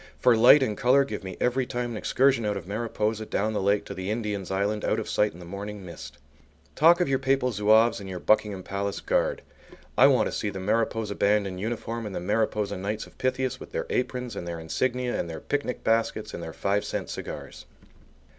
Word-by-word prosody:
For 125 - +4
light 125 +5 +7
and 110 -5 -1
colour 135 +4 +4
give 135 - -6
me 95 - -7
every 125 +1 +1
time 120 -1 -3
an 115 - -4
excursion 130 +1 +2
out 105 -1 -1
of 90 - -7
Mariposa 110 +1 -2
down 110 +2 -1
the 105 - -1
lake 100 +1 +2
to - - -6
the 95 +1 -5
Indian's 105 -4 -3
Island 100 +2 -1
out 110 - +1
of 110 - -5
sight 105 0 +1
in - - -14
the 90 - -10
morning 100 +2 -7
mist. 80 -4 -9 0.6
Talk 170 +4 +6
of 180 - +2
your 135 -1 +1
Papal 135 -1 +1
Zouaves 110 +2 +4
and 100 -1 -8
your 95 - -5
Buckingham 105 0 +1
Palace 100 +1 -3
Guard! - - 0 0.5
I - - +7
want - - +4
to - - -2
see 105 - -1
the 95 - -6
Mariposa 110 +1 0
band 105 0 +2
in 95 -1 -5
uniform 115 +1 -3
and 100 - -6
the - - -1
Mariposa 105 +1 0
Knights 105 +3 -3
of - - -19
Pythias 130 0 -1
with - - -11
their - - -2
aprons 125 -2 -2
and 85 - -5
their 85 -1 -4
insignia 125 +9 -1
and 85 - -3
their 80 - -6
picnic 140 -3 -3
baskets 115 0 0
and - - -5
their - - -6
five 100 +1 0
cent - - -4
cigars! - - -7
105 Hz, 220 wpm, -26 LUFS, 100-120 Hz, 0.6 s, light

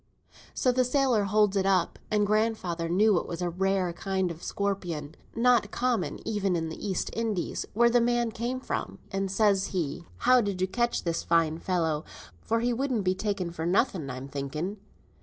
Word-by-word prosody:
So 255 - +3
the 255 +1 +2
sailor 250 -5 +2
holds 210 0 +3
it 195 -1 +2
up, 185 -3 +1
and 210 -1 +2
grandfather 205 -6 0
knew 200 +1 +4
it - - -7
was 170 - -5
a 175 -1 -1
rare 190 0 0
kind 190 0 -1
o' 165 - -7
scorpion, 175 -6 -3 0.2
not 240 -2 +3
common 225 - -1
even 200 -4 0
in 165 -1 -1
the 160 - -6
East 190 -3 -2
Indies 220 -6 -2
where 235 +2 +5
the 240 0 +4
man 240 -1 +1
came 240 +3 -3
from; - - -4
and 195 0 -1
says 195 -1 +2
he, 170 -2 -3
'How 250 0 +5
did 200 -4 -2
ye 185 - +2
catch 235 +5 0
this 170 -1 -1
fine 165 -1 +2
fellow, 160 -5 0 0.4
for 230 0 0
he 245 +1 +1
wouldn't 250 -3 -1
be 185 0 +2
taken 190 -3 -2
for 165 -1 -3
nothing 180 - +1
I'm 130 +1 -6
thinking?' 150 +8 -4
195 Hz, 185 wpm, -28 LUFS, 170-225 Hz, 0.4 s, where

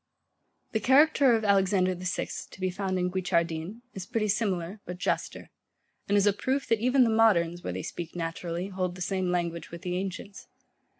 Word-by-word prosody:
The 220 - 0
character 270 +1 +5
of 220 -1 -1
Alexander 190 -2 +3
the 180 +1 -5
Sixth, - - -4
to - - -14
be 185 -1 0
found 190 0 -2
in 180 0 0
Guicciardin, 175 -2 +1
[Footnote: 160 -1 -3
Lib. 210 +9 -9
i.] 250 - -42
is 190 -1 -7
pretty 225 -3 0
similar, 195 -2 -1
but 180 0 -7
juster; 180 - -3 0.6
and 205 - +3
is 200 - +4
a 205 - +4
proof 265 +7 -1
that 230 - +3
even 255 +3 +4
the 230 - +2
moderns, 175 -7 +3
where - - -3
they - - -4
speak 170 -1 -6
naturally, 170 +2 -4
hold 185 -2 -2
the 180 - -10
same 185 0 -1
language 170 -1 -2
with 170 +1 -9
the 180 -1 -2
ancients. 195 +1 -6
190 Hz, 205 wpm, -28 LUFS, 175-215 Hz, 0.6 s, character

